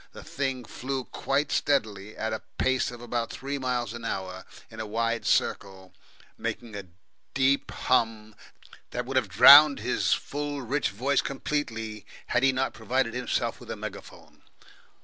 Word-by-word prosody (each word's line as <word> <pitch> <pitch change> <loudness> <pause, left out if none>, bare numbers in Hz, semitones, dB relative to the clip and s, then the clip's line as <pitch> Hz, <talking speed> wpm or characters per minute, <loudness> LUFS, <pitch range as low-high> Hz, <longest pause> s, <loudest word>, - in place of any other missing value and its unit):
The - - -10
thing 135 -3 -3
flew 130 +3 -4
quite 140 +4 -1
steadily 110 -7 0
at 110 0 -2
a 110 - -4 0.2
pace 130 0 +1
of 120 -1 -10
about 120 -1 -2
three 140 +1 -5
miles 125 -4 -2
an 120 0 -8
hour, 95 -4 -4 0.3
in 110 - -10
a 110 - -3
wide 115 0 -1
circle, 95 -1 -1 0.5
making 115 -3 -5
a 100 -2 -7 0.5
deep 135 +1 +2
hum 110 -3 0 0.6
that, 125 0 -4
would 135 +1 -5
have 125 -6 +2
drowned 140 +8 +9
his 125 +3 0
full, 145 -1 -4
rich 140 +5 0
voice 130 +7 +1
completely 115 -7 -4 0.2
had 125 - +1
he 135 0 +4
not 130 +1 -1
provided 120 +1 -1
himself 125 0 -2
with - - -13
a - - -3
megaphone. - - -10
120 Hz, 155 wpm, -27 LUFS, 110-135 Hz, 0.6 s, drowned